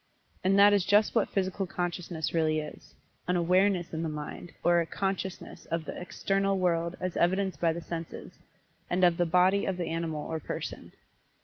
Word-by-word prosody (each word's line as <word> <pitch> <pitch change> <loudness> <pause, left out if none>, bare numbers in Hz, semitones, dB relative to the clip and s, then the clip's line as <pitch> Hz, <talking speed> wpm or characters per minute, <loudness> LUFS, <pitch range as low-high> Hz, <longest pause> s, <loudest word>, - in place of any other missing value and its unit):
And 190 +1 +3
that 205 +1 +7
is 200 -2 +3
just 205 +3 +3
what 225 - +2
Physical 190 0 -1
Consciousness 175 -2 -3
really 160 -2 +2
is 150 -1 -7 0.3
an 180 - +1
"awareness" 180 +1 +2
in 160 - -2
the 165 - -2
mind, 150 +3 -7
or 175 0 +4
a - - -2
"consciousness" 190 -3 -4
of 165 -1 -2
the - - -6
"external" 195 +2 0
world 170 -1 0
as 185 -1 -3
evidenced 190 -2 +1
by 165 -1 +3
the 170 +1 -5
senses; 165 -1 -7 0.5
and 180 +1 +1
of 175 -2 +5
the 175 - +2
"body" 185 +4 +4
of 190 -2 -1
the 175 - -2
animal 160 -2 -3
or 160 0 -3
person. - - -6
175 Hz, 185 wpm, -29 LUFS, 165-190 Hz, 0.5 s, that